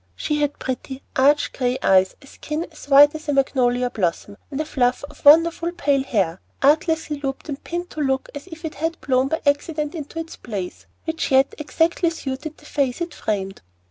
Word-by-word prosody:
She 300 -1 -1
had 290 0 0
pretty, 260 +1 -5
arch, 285 +3 +3
gray 250 -1 0
eyes, 190 -1 +4
a - - -14
skin 300 +4 -5
as 310 - -13
white 290 +1 +8
as 315 -1 -7
a - - +2
magnolia 250 -2 +2
blossom, 200 +1 -2
and 280 -1 -5
a 310 - -1
fluff 250 -4 0
of 295 - -19
wonderful 330 +3 +6
pale 280 -4 +1
hair 190 -9 -1 0.2
artlessly 315 +1 +2
looped 270 +2 -4
and 280 -1 -5
pinned 350 +1 -4
to 310 - -4
look 265 -2 0
as 285 +4 -8
if 325 -1 -9
it 315 - -4
had 325 +2 -3
blown 260 -1 +2
by 320 +3 -2
accident 300 +1 0
into 310 -1 -7
its 325 0 -5
place 195 -6 -6 0.2
which 320 -1 -2
yet 270 0 +4
exactly 325 +3 +1
suited 300 -1 -5
the 300 - -19
face 275 -3 -1
it 340 -1 -4
framed. 195 -2 -3
285 Hz, 195 wpm, -22 LUFS, 260-315 Hz, 0.2 s, white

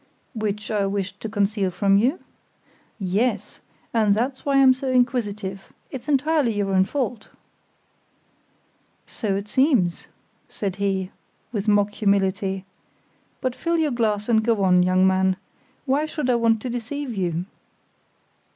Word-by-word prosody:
"Which 215 -2 -3
I 205 -2 +1
wished 200 0 -3
to 220 - -5
conceal 205 -2 0
from 195 +2 +2
you?" 250 - +2 0.8
"Yes, 210 +2 -1 0.3
and 215 -3 +3
that's 255 +4 -2
why 280 -1 +1
I'm 265 -1 +7
so 260 +1 -4
inquisitive; 215 -6 -1 0.2
it's 265 +2 -7
entirely 290 -3 +2
your 200 -1 -1
own 190 0 +4
fault." 245 -3 -3 1.8
"So 205 -3 -2
it 200 +1 -4
seems," 240 - +2 0.4
said 195 -3 -4
he, 195 -2 -1 0.4
with 215 -2 -3
mock 205 0 +3
humility; 195 -2 0 0.8
"but 255 -2 -1
fill 335 0 -1
your 315 -3 +1
glass 215 -4 0
and 220 -2 +3
go 225 -3 +1
on, 180 -1 +5
young 185 +1 +3
man. 190 0 +2 0.5
Why 285 +3 +1
should 300 -5 -1
I - - +3
want 230 -2 +2
to 255 - -3
deceive 245 +3 -4
you?" 175 -2 -1
210 Hz, 140 wpm, -23 LUFS, 195-250 Hz, 1.8 s, I'm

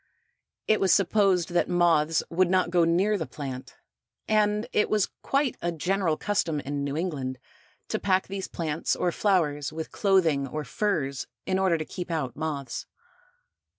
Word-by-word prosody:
It 215 - +3
was 190 -2 +3
supposed 195 -3 +3
that 175 0 +1
moths 165 -3 +3
would 180 +1 +2
not 185 -2 +2
go 175 -2 +4
near 190 +5 +2
the 160 - -3
plant, 130 -3 -7 0.5
and 210 0 +2
it 210 - +2
was 210 -2 +1
quite 275 -1 0
a 175 - 0
general 170 0 0
custom 175 -7 0
in 140 0 -3
New 140 +1 -2
England 140 -7 -3 0.5
to - - -1
pack 190 -1 +2
these 195 0 -4
plants 160 -1 -2
or 175 - 0
flowers 155 -8 +1
with 160 0 -6
clothing 175 - +2
or 155 +3 -4
furs 145 - -1 0.2
in 190 0 0
order 185 -3 +3
to 155 - -4
keep 180 +2 -6
out 150 -7 -2
moths. 145 -5 -4
170 Hz, 160 wpm, -27 LUFS, 150-195 Hz, 0.5 s, go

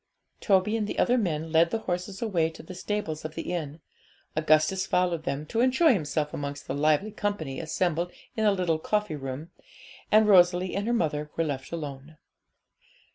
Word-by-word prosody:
Toby 200 +1 +2
and 215 -2 -1
the - - -5
other 245 - +3
men 165 -8 -1
led 165 +1 +4
the 225 - 0
horses 185 +3 -3
away 175 -8 +1
to 160 - -12
the 185 - -9
stables 180 -4 -3
of 155 0 -6
the 165 +2 -4
inn; 155 -2 -4 0.5
Augustus 155 +4 +2
followed 175 -3 +1
them, 145 -2 -2
to 225 - -3
enjoy 260 +4 +5
himself 150 -5 -1
amongst 140 0 -5
the - - -3
lively 155 +8 +2
company 200 -11 -3
assembled 170 +1 -1 0.2
in 220 - -1
the 210 - +5
little 180 -5 0
coffee 210 -1 -1
room, 135 +4 -6 0.6
and 215 0 +6
Rosalie 180 -2 +5
and 200 +2 -2
her - - +1
mother 150 -8 -1
were 165 - +2
left 135 -4 -4
alone. 150 -2 -7
170 Hz, 180 wpm, -27 LUFS, 155-200 Hz, 0.6 s, and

